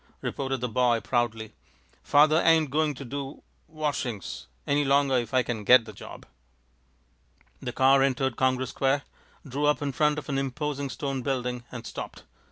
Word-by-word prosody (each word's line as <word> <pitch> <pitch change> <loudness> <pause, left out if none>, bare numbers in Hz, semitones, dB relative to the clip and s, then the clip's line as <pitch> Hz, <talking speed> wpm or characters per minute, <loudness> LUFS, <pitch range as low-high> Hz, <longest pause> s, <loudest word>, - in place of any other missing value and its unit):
responded 135 -2 -2
the 125 - 0
boy, 120 0 +2
proudly. 115 -3 -1 0.5
"Father 155 +3 +4
ain't 160 -4 +4
going 150 0 +1
to 135 - -8
do 140 +2 -6 0.2
washings 145 - -4 0.2
any 145 +1 +2
longer 140 -1 +3
if 120 -2 -5
I 130 -1 +3
can 115 -3 -4
get 120 +2 +6
the 110 - -10
job." - - -11 1.4
The 125 - -4
car 135 +2 +4
entered 135 -2 +1
Congress 130 0 0
Square, 135 +1 +1 0.4
drew 140 +3 -1
up 150 - +3
in 145 -1 -2
front 150 +2 +2
of 150 - -6
an 135 -2 -1
imposing 140 +1 -3
stone 135 0 -3
building, 125 -1 -2
and 120 -2 -7
stopped. - - -7
135 Hz, 165 wpm, -27 LUFS, 125-145 Hz, 1.4 s, get